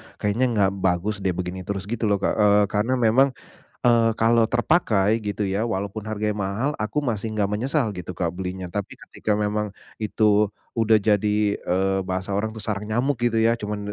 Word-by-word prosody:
"Kayaknya 105 +5 0
nggak 100 -2 +3
bagus 95 +3 0
deh 95 -2 -1
begini 90 0 -4
terus." 100 -2 -3
Gitu 110 +1 -2
loh 100 - +3
Kak, - - +2
eee, 105 0 +5
karena 115 +5 +1
memang, 125 +3 +3 0.4
eee, 115 -2 +4
kalau 115 +1 +4
terpakai 110 - +2
gitu 105 0 -2
ya, 100 +4 0
walaupun 100 -1 -3
harganya 105 -1 -2
mahal, 100 +7 -1
aku 110 +6 -2
masih 115 -5 -2
enggak 105 -2 0
menyesal 115 - -1
gitu 90 0 -6
Kak 85 -1 -3
belinya. 95 0 -5
Tapi 100 +2 -4 0.2
ketika 105 -1 -2
memang 105 0 -1 0.3
itu 105 0 +2 0.2
udah 110 -2 +4
jadi, 105 0 +2
eee, 95 +1 0
bahasa 95 +1 -3
orang 110 +2 -1
tuh 110 - -9
sarang 105 -1 -2
nyamuk 125 +6 0
gitu 115 -2 +2
ya 115 +1 +3
cuman, 105 -2 -4
105 Hz, 180 wpm, -23 LUFS, 100-115 Hz, 0.4 s, eee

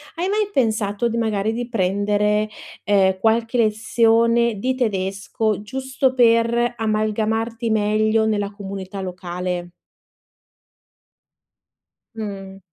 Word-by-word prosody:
hai 345 +2 -1
mai 415 +1 0
pensato 220 - 0
d 230 - -3
magari 220 -2 0
di 240 +1 -3
prendere, 210 0 +1 0.4
ehm, 190 -2 +3
qualche 230 +3 +1
lezione 230 0 +2
di 255 +5 0
tedesco 205 -1 -1
giusto 265 +3 -1
per 235 0 +3
amalgamarti 225 +1 -1
meglio 215 +1 +2
nella 205 -2 -1
comunità 195 -1 -7
locale? 180 -1 -4 2.4
Mh. 195 -3 -7
215 Hz, 95 wpm, -21 LUFS, 200-230 Hz, 2.4 s, ehm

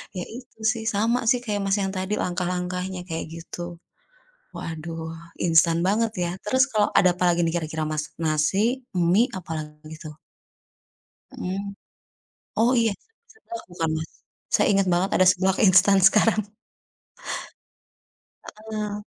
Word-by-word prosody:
Ya 180 - -3
itu 245 -2 -12
sih, 225 0 +1
sama 230 +4 +2
sih 245 +1 +4
kayak 210 -3 -2
Mas 195 +1 +2
yang 190 - -1
tadi 190 +1 -3
langkah-langkahnya 180 +1 -2
kayak 165 -1 -4
gitu. 175 +1 -7 0.8
Waduh, 165 0 -6 0.3
instan 165 0 +4
banget 220 +2 +2
ya. 170 - -1
Terus 260 +5 +3
kalo 210 -2 +2
ada 185 - +6
apalagi 175 -1 +2
nih 165 - -1
kira-kira, 155 0 -3
Mas, 155 -1 -2 0.2
nasi, 195 - +1
mie, 185 +9 +3
apalagi 155 -2 -7
tuh? 155 -1 -9 1.2
Mhm. 190 +2 -3 0.9
Oh 235 +3 +4
iya, 225 -2 +2 0.4
seblak 350 -6 -9
bukan, 165 -2 -1
Mas? 160 - -6 0.5
Saya - - +3
inget 195 -1 +2
banget 185 +3 +1
ada 185 - +5
seblak 190 +1 0
instan 190 +1 +6
sekarang. 220 0 +3 2.3
Heeh. 210 -1 -3
185 Hz, 130 wpm, -24 LUFS, 165-215 Hz, 2.3 s, ada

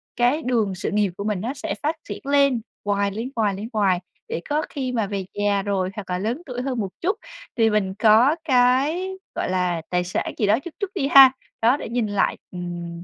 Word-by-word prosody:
cái 245 +6 +2
đường 225 -6 +1
sự 185 - -3
nghiệp 205 -2 +1
của 200 - -4
mình 205 -3 -1
nó 240 +6 -2
sẽ 305 +3 -4
phát 310 +3 +1
triển - - -5
lên 280 -4 +3 0.2
hoài, 200 0 +1
lên 225 +5 -4
hoài, 215 -3 +1
lên 205 +4 -6
hoài 195 -4 +2 0.3
để 170 - -3
có 300 +1 +1
khi 265 -3 -3
mà 230 -4 0
về 195 -2 -3
già 205 -1 +1
rồi 195 -2 0
hoặc 205 -3 -7
là 180 - 0
lớn 230 - -2
tuổi 250 -3 -4
hơn 255 -2 -2
một 200 -3 -2
chút 385 +5 0 0.4
thì 225 -1 +4
mình 205 -3 0
có 230 +7 +6
cái, 275 +6 +2 0.3
gọi - - -2
là, 180 -2 0
tài 180 0 +1
sản 180 - -3
gì 210 - +1
đó 215 +4 +4
chút 320 +3 -9
chút 405 -3 -3
đi 275 -7 0
ha. 270 -2 +9 0.3
Đó, 240 +5 +4
để - - -7
nhìn 235 -1 0
lại, 205 -1 +1
ừm, 175 -1 -6
220 Hz, 225 wpm, -23 LUFS, 195-265 Hz, 0.4 s, ha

